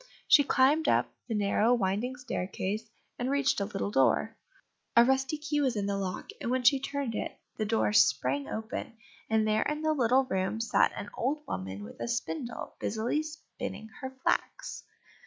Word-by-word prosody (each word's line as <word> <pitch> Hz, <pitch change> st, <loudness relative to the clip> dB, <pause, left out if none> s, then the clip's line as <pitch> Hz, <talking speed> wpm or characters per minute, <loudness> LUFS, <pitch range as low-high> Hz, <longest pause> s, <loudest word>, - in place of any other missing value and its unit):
She 285 Hz, -, +7 dB
climbed 285 Hz, +4 st, +3 dB
up -, -, +2 dB
the 225 Hz, -, -2 dB
narrow 210 Hz, +3 st, +3 dB
winding 215 Hz, +4 st, -1 dB
staircase, 215 Hz, -3 st, -3 dB, 0.3 s
and 245 Hz, +1 st, -1 dB
reached 280 Hz, -3 st, +2 dB
a 200 Hz, -, 0 dB
little 100 Hz, -, -3 dB
door. 175 Hz, -, +2 dB, 0.6 s
A 235 Hz, -, +9 dB
rusty 265 Hz, +4 st, +1 dB
key 295 Hz, -1 st, -1 dB
was 260 Hz, -4 st, +1 dB
in 205 Hz, -1 st, -1 dB
the 200 Hz, 0 st, 0 dB
lock, 190 Hz, -2 st, -4 dB
and -, -, -2 dB
when 255 Hz, 0 st, +1 dB
she 270 Hz, +2 st, +6 dB
turned 275 Hz, -3 st, -3 dB
it -, -, -4 dB, 0.2 s
the 215 Hz, -, 0 dB
door 215 Hz, -1 st, +1 dB
sprang 140 Hz, -, +3 dB
open, 220 Hz, +4 st, -5 dB, 0.3 s
and 220 Hz, -1 st, +2 dB
there 215 Hz, 0 st, +2 dB
in 300 Hz, +1 st, -1 dB
a 310 Hz, -, +3 dB
little 260 Hz, -2 st, +3 dB
room 190 Hz, -1 st, -1 dB
sat 230 Hz, -, +3 dB
an 205 Hz, -, -6 dB
old 295 Hz, +5 st, -1 dB
woman 95 Hz, +2 st, -4 dB
with 105 Hz, -, -11 dB
a -, -, -2 dB
spindle, 235 Hz, -1 st, -3 dB
busily 225 Hz, +7 st, 0 dB
spinning 305 Hz, -7 st, -7 dB
her 260 Hz, -, -3 dB
flax. -, -, -1 dB
230 Hz, 175 wpm, -30 LUFS, 200-265 Hz, 0.6 s, A